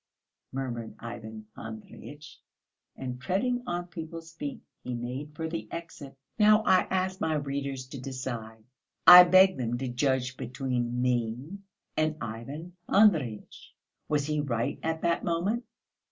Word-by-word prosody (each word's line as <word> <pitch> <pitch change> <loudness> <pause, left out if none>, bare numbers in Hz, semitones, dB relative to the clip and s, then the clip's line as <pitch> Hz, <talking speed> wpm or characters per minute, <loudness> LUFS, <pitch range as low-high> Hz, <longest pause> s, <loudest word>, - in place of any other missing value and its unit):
murmured 120 -4 -4
Ivan 110 -2 -8
Andreyitch, 145 +7 -10 0.6
and 125 -1 -6
treading 245 - 0
on 175 0 -2
people's 165 -1 -8
feet, 145 -3 -6 0.2
he 125 - -4
made 130 +5 -5
for 160 +1 -3
the 165 0 -5
exit. 150 -5 -8 0.2
Now 215 0 +6
I 185 -3 +4
ask 190 0 -1
my 160 -1 +1
readers 140 -2 -3
to 135 -2 -7
decide, 120 -4 -6 0.4
I 180 +1 +13
beg 185 0 +6
them 120 -1 -1
to 130 +1 -3
judge 130 0 0
between 125 -1 -2
me 125 - -1 0.4
and 155 0 +1
Ivan 140 +11 -7
Andreyitch. 160 - +2 0.3
Was 145 -2 +1
he 150 0 -1
right 120 -5 -2
at 160 0 -2
that 170 -1 +1
moment? 195 +8 0
140 Hz, 135 wpm, -28 LUFS, 125-170 Hz, 0.6 s, I